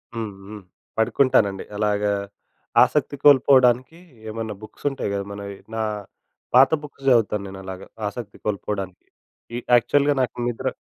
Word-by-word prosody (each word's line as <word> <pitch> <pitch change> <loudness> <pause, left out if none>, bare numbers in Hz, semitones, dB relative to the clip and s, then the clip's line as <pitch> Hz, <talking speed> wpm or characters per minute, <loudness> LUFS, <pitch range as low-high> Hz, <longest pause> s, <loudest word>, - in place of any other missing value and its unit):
హ్మ్. 110 -3 -3 0.2
హ్మ్. 105 -1 -9 0.4
పడుకుంటానండి. 110 -4 +2
అలాగా 105 -1 +1 0.7
ఆసక్తి - - 0
కోల్పోవడానికి 130 0 +5 0.3
ఏమన్నా 110 0 -4
బుక్స్ 110 +6 -13
ఉంటాయి 135 -6 -4
కదా! 100 0 -2
మనవి 100 0 -7 0.2
నా 110 - -1 0.7
పాత 130 +4 +7
బుక్స్ 140 -1 -12
చదువుతాను, 110 -4 +3
నేను 95 0 -9
అలాగా. 95 0 -8 0.2
ఆశక్తి 105 -1 -7
కోల్పోడానికి. 100 -2 -4 0.5
ఈ - - -1 0.2
యాక్చువల్‌గా 145 +4 +3
నాకు 125 - -1
నిద్ర 120 +2 -3
110 Hz, 130 wpm, -23 LUFS, 100-130 Hz, 0.7 s, పాత